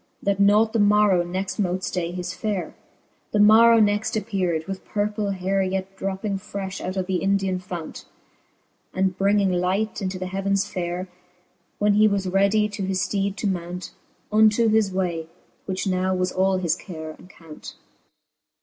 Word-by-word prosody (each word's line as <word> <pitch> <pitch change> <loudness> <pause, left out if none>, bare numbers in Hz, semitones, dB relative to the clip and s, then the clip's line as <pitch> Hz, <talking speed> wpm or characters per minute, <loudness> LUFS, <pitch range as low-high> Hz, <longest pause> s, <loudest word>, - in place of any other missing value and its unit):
That 200 -1 0
nought 210 +2 +4
the 230 - +1
morrow 205 -3 +4
next 185 +4 -4
mote 185 -1 -1
flay 175 -2 -2
his 180 0 -5
fare. 205 -4 -3 0.6
The 210 - +2
morrow 225 +2 +7
next 210 +2 +1
appear'd, 185 -7 -1
with 195 +1 -6
purple 210 0 -2
hayre 195 +1 0
Yet 190 0 -3
dropping 195 +1 -3
frefh 195 0 -6
out 185 +1 -4
of 185 - -1
the 185 -1 -1
hidian 195 -1 0
fount, 175 -3 -7 0.9
And 190 0 +1
bringing 200 0 +2
light 190 +5 -1
into 185 -1 -3
the 185 - -4
heavens 195 +1 -1
fayre. 180 +1 -4 0.7
When 205 0 +2
he 215 +1 +5
was 200 -2 0
readie 200 +3 +2
to 205 -1 -5
his 190 -1 -1
fteede 200 -1 -1
to 210 - -2
mount, 180 -1 -4 0.4
Unto 220 +1 +4
his 215 -2 +2
way, 175 -4 -2 0.4
which 190 -1 -2
now 185 0 0
was 185 0 0
all 190 0 +1
his 175 -3 0
care 160 -4 -8
and 175 - -16
count. 165 -5 -12
195 Hz, 165 wpm, -23 LUFS, 185-205 Hz, 0.9 s, morrow